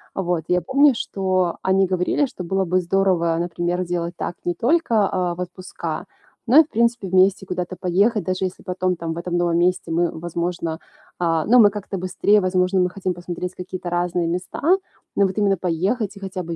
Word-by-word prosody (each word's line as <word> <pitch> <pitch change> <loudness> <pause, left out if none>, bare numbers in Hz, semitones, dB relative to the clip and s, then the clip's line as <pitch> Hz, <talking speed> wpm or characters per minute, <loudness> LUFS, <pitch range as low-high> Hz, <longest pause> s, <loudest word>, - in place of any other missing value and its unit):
Вот, 175 -4 -1
я 180 0 +2
помню, 275 - +4
что 185 -5 -1
они 190 0 +3
говорили, 185 +10 +1
что 190 -9 -8
было 190 +2 0
бы 185 0 +1
здорово, 180 -2 +1
например, 175 +1 -1
делать 175 -1 -3
так - - -4
не 175 - +1
только, 235 - +2
а, 180 -2 -1
в 180 - -6
отпуска, 180 +1 -6 0.4
но 260 +6 +5
и, - - +8
в 310 - -19
принципе, 235 -3 0
вместе 190 +1 +3
куда-то 180 0 -4
поехать, 195 +5 +1
даже 185 0 -1
если 185 - -6
потом, 185 0 -1
там, 165 -1 -5
в 165 - -5
этом 175 0 -3
новом 175 -1 +1
месте, 180 -1 +1
мы, 170 0 0
возможно 170 -1 -3 0.4
А, 165 -2 +1
ну 245 +2 +6
мы 205 -2 +8
как-то 200 -1 -6
быстрее, 185 +3 +2
возможно, 185 0 +1
мы 180 0 +2
хотим 185 0 -3
посмотреть 175 +1 -6
какие-то 180 0 -6
разные 175 0 0
места, 180 +2 -4 0.6
но 200 - +5
вот 190 +2 -3
именно 200 -2 +2
поехать 190 +5 -1
и 200 - -11
хотя 185 -1 -5
бы 165 0 -5
180 Hz, 195 wpm, -22 LUFS, 175-195 Hz, 0.6 s, и